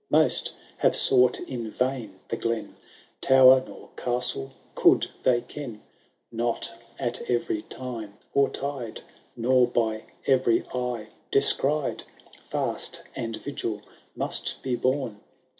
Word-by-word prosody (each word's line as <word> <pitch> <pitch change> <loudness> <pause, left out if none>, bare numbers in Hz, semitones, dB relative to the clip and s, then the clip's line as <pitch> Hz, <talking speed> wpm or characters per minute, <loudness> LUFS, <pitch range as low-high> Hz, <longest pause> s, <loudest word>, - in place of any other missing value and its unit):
Most - - +3 0.2
have - - +3
sought 125 -1 +5
in 120 -4 -5
vain 120 -5 -2
the - - 0
glen. 115 0 -2 0.5
Tower 130 0 +7
nor - - -12
castle 120 - -2 0.2
could - - +5 0.2
they 120 -2 +3
ken; 120 -3 -8 0.5
Not 115 0 -2 0.2
at 120 -3 -2
every 120 -3 0
time 115 -6 -7 0.2
or 140 0 +4
tide. 135 -5 -5 0.3
Nor 125 +1 +4
by 110 -2 0 0.2
every 130 -3 +3
eye, 125 -3 -3 0.2
descried. 140 +1 +2 0.5
Fast - - -1
and 115 -1 -3
vigil 110 -7 -4 0.3
must - - -3
be 130 -2 0
borne. 130 -4 -1
125 Hz, 115 wpm, -26 LUFS, 115-130 Hz, 0.5 s, Tower